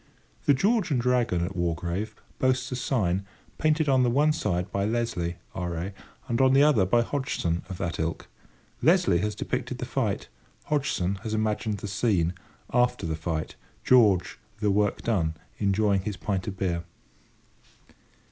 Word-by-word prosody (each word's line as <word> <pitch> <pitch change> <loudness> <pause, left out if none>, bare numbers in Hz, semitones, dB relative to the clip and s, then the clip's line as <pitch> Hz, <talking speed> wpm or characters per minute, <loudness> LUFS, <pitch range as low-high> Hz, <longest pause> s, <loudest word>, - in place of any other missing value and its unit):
The 145 - +6
"George 205 - +2
and 135 -5 +1
Dragon" 120 -8 +1
at 95 +2 -6
Wargrave 85 +4 -2 0.2
boasts 130 0 +1
a - - -1
sign, 100 -8 0 0.4
painted 155 0 +2
on 135 -2 +4
the 125 - +3
one 150 +5 +3
side 90 - -1
by 100 - 0
Leslie, 105 -6 -1 0.2
R.A., 90 +1 -3 0.3
and 120 0 +1
on 130 0 +5
the 140 - +7
other 125 -11 +4
by 120 +4 +3
Hodgson 115 - -1
of 95 - -5
that 85 -2 -3
ilk. 80 0 -2 0.5
Leslie 170 - +4
has 105 +2 -1
depicted - - -3
the - - -4
fight; - - -1 0.4
Hodgson 100 -11 0
has 110 -2 -3
imagined 110 0 -1
the 100 - -6
scene, 95 -4 +1 0.4
"After 125 -4 +2
the 80 -1 -1
Fight"—George, 90 +5 +1 0.2
the 105 -2 +2
work 105 +1 +1
done, 85 -8 0 0.2
enjoying 100 -1 +2
his 100 0 -4
pint 95 -3 -2
of 95 -2 -4
beer. 85 -3 -1
105 Hz, 155 wpm, -27 LUFS, 90-125 Hz, 0.5 s, the